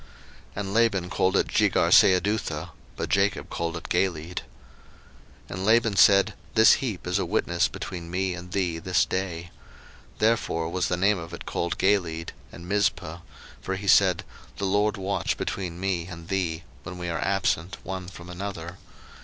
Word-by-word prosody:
01:031:047 - - -22 0.5
And 100 -1 -4
Laban 100 -6 +2
called 95 +1 +2
it - - +2
Jegarsahadutha: 90 -4 +3 0.3
but - - -3
Jacob 100 +1 +1
called 85 0 -2
it - - -8
Galeed. 85 -1 -1 1.1
01:031:048 - - -24
And 95 +1 -4
Laban 115 -1 +4
said, 100 +1 +6 0.2
This 110 0 +8
heap 115 -9 -3
is 90 +2 0
a - - 0
witness 85 +2 +1
between 85 -4 -7
me 95 +1 -1
and 90 0 -9
thee 90 -4 -1
this 80 -2 +2
day. 90 -2 -4 0.7
Therefore 110 -7 +1
was 90 +1 -1
the 90 - 0
name 100 +2 +2
of 85 +1 -7
it - - -10
called 85 0 -2
Galeed; 85 -5 +1
01:031:049 - - -11 0.2
And 85 +1 -10
Mizpah; 90 -4 0 0.4
for 95 - -3
he 100 +1 -6
said, 95 -3 +5 0.3
The 100 - -2
LORD 105 +2 +1
watch 95 -1 -1
between 90 -3 -4
me 90 -3 -1
and 85 -2 -10
thee, 85 -4 -1 0.2
when 90 +1 -8
we 90 0 -5
are 85 -1 -2
absent 95 -2 0
one 95 -1 -5
from 90 -1 -11
another. 90 -1 -6
90 Hz, 170 wpm, -26 LUFS, 85-100 Hz, 1.1 s, This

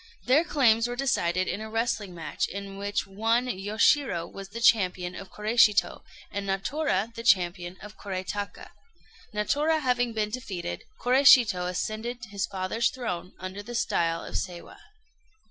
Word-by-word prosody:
Their 270 +6 +5
claims 235 -8 +3
were 245 - -4
decided 185 -9 0
in 210 - -3
a 220 - -6
wrestling 220 -4 -2
match, 165 -2 -2
in 195 0 -7
which 205 0 -1
one 225 +5 +1
Yoshirô 210 - +1
was 195 -1 -8
the 225 +3 -7
champion 185 -6 +3
of 195 +1 -9
Koréshito, 210 -1 +3 0.3
and 200 0 -4
Natora 215 +2 -1
the 230 - -7
champion 180 -4 +2
of 210 +1 -11
Korétaka. 200 +1 -5 0.6
Natora 290 +9 +1
having 250 -4 +1
been 210 -1 -1
defeated, 190 - -5
Koréshito 245 -8 +5
ascended 225 +6 -4
his 200 -1 -2
father's 195 +4 0
throne 185 -8 -5
under 185 +2 -6
the 240 +4 -8
style 165 -6 0
of - - -9
Seiwa. 175 -1 -6
210 Hz, 145 wpm, -27 LUFS, 185-240 Hz, 0.6 s, Their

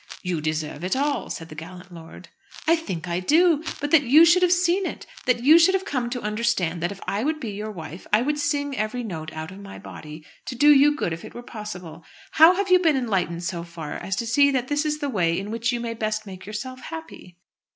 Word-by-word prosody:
"You 180 -4 -2
deserve 155 0 -3
it 185 - 0
all," 280 -1 -1
said 165 -1 -6
the - - -9
gallant 180 +3 -10
lord. 165 -1 -12 0.4
"I 330 +1 +5
think 185 - -5
I 170 0 -1
do. 315 - +3 0.2
But 290 0 -3
that 325 -3 +7
you 295 +5 +6
should 345 +2 +5
have 360 -1 +4
seen 360 +1 +2
it, - - -7 0.2
that 245 -1 +2
you 310 +5 +8
should 375 +3 +5
have 385 0 -1
come 255 -9 -2
to 245 0 -5
understand 210 -6 -1
that 175 +2 -1
if 200 - -9
I 205 +3 -2
would 310 +2 -1
be 235 -7 -5
your 210 +2 -5
wife 170 -3 -9
I 215 +3 +4
would 295 +2 -1
sing 290 -1 -1
every 215 +2 -2
note 160 -7 -6
out 160 +2 -7
of 190 - -11
my 200 0 -10
body, 155 0 -10 0.2
to 255 - -4
do 295 +4 +6
you 290 +1 +5
good 175 - -2
if 165 - -8
it - - -11
were 240 - -8
possible. 180 -8 -8 0.3
How 325 +3 +7
have 390 0 -1
you 365 - +7
been 325 -5 +3
enlightened 185 -8 -1
so 170 0 -3
far 170 -3 -7
as 195 - -4
to 235 - -3
see 280 +5 +4
that 260 -2 -1
this 295 +1 0
is 300 0 -1
the 290 - -1
way 170 -8 +1
in 200 +3 -4
which 230 +1 -1
you 240 - -2
may 235 -1 -3
best 215 -1 -3
make 190 -1 -10
yourself 255 +5 -6
happy?" 320 - -10
230 Hz, 245 wpm, -24 LUFS, 180-290 Hz, 0.4 s, you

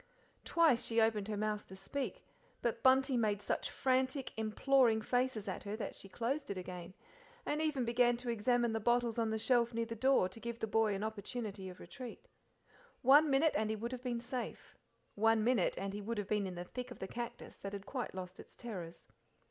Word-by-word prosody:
Twice 320 -8 +4
she 230 0 +1
opened 220 -2 +2
her 210 -1 -2
mouth 210 0 -2
to 190 - -10
speak, 260 +9 -4 0.4
but 230 -1 0
Bunty 265 +1 +5
made 210 -3 +1
such 205 - -2
frantic, 260 +1 0
imploring 225 +2 +3
faces 245 -1 0
at 190 - -3
her 205 +1 -4
than 220 - -4
she 195 - -11
closed 265 +8 -2
it 200 - -3
again, 180 0 -7 0.5
and 300 +1 0
even 295 -6 +1
began 240 0 +3
to 245 0 -5
examine 235 +1 +2
the 225 - 0
bottles 240 +1 +2
on 225 -1 +1
the 220 - 0
shelf 235 +1 +2
near 230 0 0
the 230 0 -5
door 260 -4 +4
to 190 +5 -10
give 235 0 -5
the 225 - -1
boy 220 -1 +2
an 195 - -3
opportunity 215 -2 -4
of 180 - -11
retreat. 245 +7 -9 0.8
One 290 +4 +7
minute 285 +3 +4
and 215 0 +1
he 220 - 0
would, 230 +3 -4
have 255 -1 -5
been 245 -2 -2
safe 245 +1 -5 0.4
one 225 +1 +3
minute 235 -5 +2
and 195 0 -3
he 205 - -4
would 225 +2 -3
have 205 -2 -2
been 210 -1 +1
in 185 - -6
the 175 - -4
thick 250 +6 -6
of 245 - -9
the 190 - -5
cactus, 235 +3 -6
that 200 0 -6
had 200 -1 -6
quite 250 -3 -4
lost 185 0 -7
its - - -13
terrors. 180 -8 -7
230 Hz, 210 wpm, -35 LUFS, 205-250 Hz, 0.8 s, One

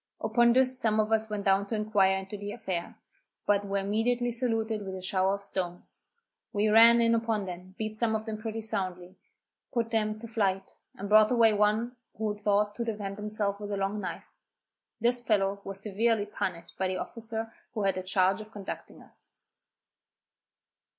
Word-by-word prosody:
Upon 235 +2 +4
this 255 0 +3
some 220 -3 +2
of 215 0 +1
us 220 0 +2
went 210 -1 -3
down 195 +1 +3
to 225 - -2
inquire 205 -3 +3
into 190 +2 -6
the 205 0 -5
affair, 190 -7 -4 0.5
but 205 -1 +3
were 200 0 -1
immediately 230 +5 0
saluted 225 -3 -1
with 190 -1 -5
a 185 - -6
shower 190 +1 +1
of 200 0 -9
stones. 180 -3 -4 0.5
We 210 +1 +1
ran 230 +2 +8
in 230 0 +4
upon 225 -3 0
them, 180 +1 -8
beat 215 0 -3
some 220 0 +2
of 220 0 -3
them 220 -2 -4
pretty 225 0 -4
soundly, 185 -3 -3 0.5
put 230 -2 -1
them 215 -1 0
to 230 +2 -8
flight, 195 -4 -1 0.2
and 200 - -6
brought 215 +1 +6
away 230 -3 +5
one 215 +4 +1 0.2
who 215 -1 -1
thought 205 0 +1
to 235 - -1
defend 205 -3 -4
himself 210 -1 -2
with 205 0 -6
a 200 - -1
long 195 +2 -1
knife. 185 - -5 0.7
This 240 +1 +2
fellow 200 -3 +1
was 195 0 -5
severely 215 +1 +1
punished 185 -4 -5
by 190 - +1
the 185 - -2
officer 225 -1 -5 0.2
who 215 - -1
had 195 -1 +3
the 185 - -4
charge 185 +1 +2
of 215 0 -12
conducting 200 -3 -8
us. - - -11
210 Hz, 185 wpm, -29 LUFS, 195-225 Hz, 0.7 s, ran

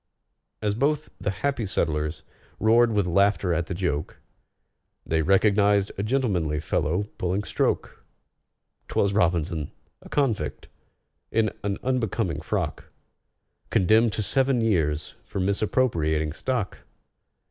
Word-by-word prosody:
As 105 -1 +1
both 145 +6 0
the - - -2
happy 135 +5 -1
settlers 80 -5 -1 0.4
roared 115 +2 +4
with 105 -3 +1
laughter 100 0 +2
at 85 +1 -1
the 90 - -3
joke, 85 -5 -2 0.9
They 80 0 +1
recognized 100 +3 +3
a - - -3
gentlemanly 100 - 0
fellow 80 +5 0 0.2
pulling 90 +3 0
stroke: - - -1 0.8
'Twas 100 0 +1
ROBINSON—a 85 -5 -2
convict, 110 - -1 0.6
in 110 -1 +1
an 100 -1 -1
unbecoming 110 - -1
frock! 85 -2 -2 0.8
Condemned 110 +4 +4
to 105 - -1
seven 135 +5 +2
years 80 -9 0
for - - -5
misappropriating 90 -6 +1
stock!!! 120 +2 -2
100 Hz, 110 wpm, -25 LUFS, 80-110 Hz, 0.9 s, roared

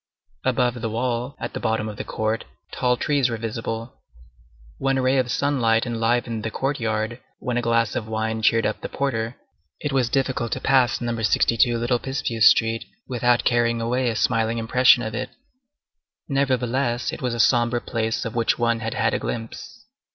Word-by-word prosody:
Above 125 -1 +1
the 115 - -2
wall, 120 +3 -2
at - - -5
the - - -4
bottom 110 -1 -1
of 105 - -6
the - - -5
court, 110 +1 -2 0.3
tall 125 -1 +1
trees 140 -3 +1
were 115 - -3
visible. 115 +1 -5 0.8
When 135 0 +1
a - - +1
ray 130 +1 +3
of 125 -1 0
sunlight 125 -4 +1
enlivened 115 -1 0
the 115 - -3
courtyard, 115 -3 -2 0.2
when 125 - -3
a 120 - +1
glass 115 -1 +1
of 110 - -3
wine 110 0 -2
cheered 115 +1 +3
up 110 - -2
the - - -5
porter, 120 -4 -2 0.4
it 145 - -3
was 130 -3 +2
difficult 130 -3 0
to - - -3
pass 130 -3 +2
Number 120 -1 -2
62 115 +3 +3
Little 120 +1 0
Picpus 120 -5 +3
Street 115 0 +1 0.2
without 120 -1 +2
carrying 120 -1 +2
away 120 +2 0
a 115 - -2
smiling 115 0 +1
impression 120 +2 +4
of 110 0 -4
it. 125 +2 -3 1.0
Nevertheless, 130 -3 0
it - - -7
was 125 -2 -1
a - - -5
sombre 120 0 +3
place 115 -1 -2
of 115 - -4
which 115 -2 +1
one 115 -1 +1
had 115 0 -4
had 110 +2 +1
a - - 0
glimpse. 115 - -6
120 Hz, 180 wpm, -23 LUFS, 115-125 Hz, 1.0 s, impression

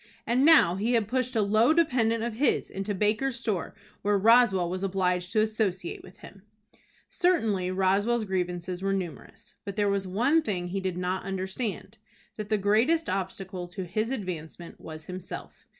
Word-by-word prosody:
And 245 +3 +2
now 280 - +6
he 225 +5 0
had 225 -4 +2
pushed 255 +1 -1
a 220 - +3
low 220 +7 +4
dependent 240 -9 +2
of 235 -1 -2
his 270 +7 0
into 195 +1 -3
Baker's 215 +6 0
store 210 -8 -3 0.3
where 205 0 +2
Roswell 215 -4 +5
was 185 +2 -4
obliged 180 -2 0
to 215 - +4
associate 215 -5 -1
with 185 +2 -15
him! 195 - -13 0.7
Certainly 225 - +1
Roswell's 195 +5 +1
grievances 180 -2 -3
were 195 0 0
numerous. 175 -7 -6
But 200 - -6
there 205 -1 +1
was 200 -1 -1
one 245 - +2
thing 180 - -3
he 195 +2 -3
did 185 -2 -3
not 180 +1 -2
understand, 195 +3 -4 0.4
that 215 -1 -6
the 215 - +2
greatest 230 +12 +2
obstacle 190 -1 -4
to 180 +2 -6
his 215 +6 -2
advancement 175 -8 -6
was 155 -1 -9
himself. 185 +1 -9
200 Hz, 165 wpm, -27 LUFS, 185-225 Hz, 0.7 s, now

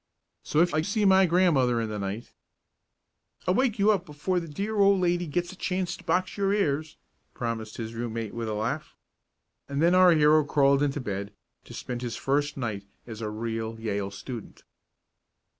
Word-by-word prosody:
So 155 - +1
if 175 - +2
I 155 - +2
see 205 +4 0
my 190 -1 +6
grandmother 155 -9 +3
in 115 - -1
the 105 -1 -4
night 100 +4 -5 0.6
" - - -37
"I'll 180 - +4
wake 245 +1 +1
you 205 +1 +4
up 195 -4 0
before 175 +3 -2
the 170 - -7
dear 200 +8 -3
old 200 -1 +5
lady 175 -1 +1
gets 175 +3 -2
a - - -11
chance 185 -1 -2
to - - -15
box 185 +2 0
your 195 -1 +1
ears," 155 -6 0 0.4
promised 115 -3 -4
his 115 -1 -5
room 115 0 -4
mate 115 -2 -4
with 115 -1 -4
a 105 - -2
laugh. 120 +9 -3 0.7
And 140 0 -2
then 170 +3 +4
our 185 -1 +7
hero 155 0 +5
crawled 140 -1 +3
into 145 0 0
bed 100 -2 -4 0.3
to - - -10
spend 125 -1 -5
his 120 -2 -4
first 145 +2 0
night 110 -6 -3 0.2
as 110 -1 -8
a 110 - -2
real 115 +1 -4
Yale 100 -3 -2
student. 110 +3 -9
145 Hz, 190 wpm, -27 LUFS, 115-180 Hz, 0.7 s, our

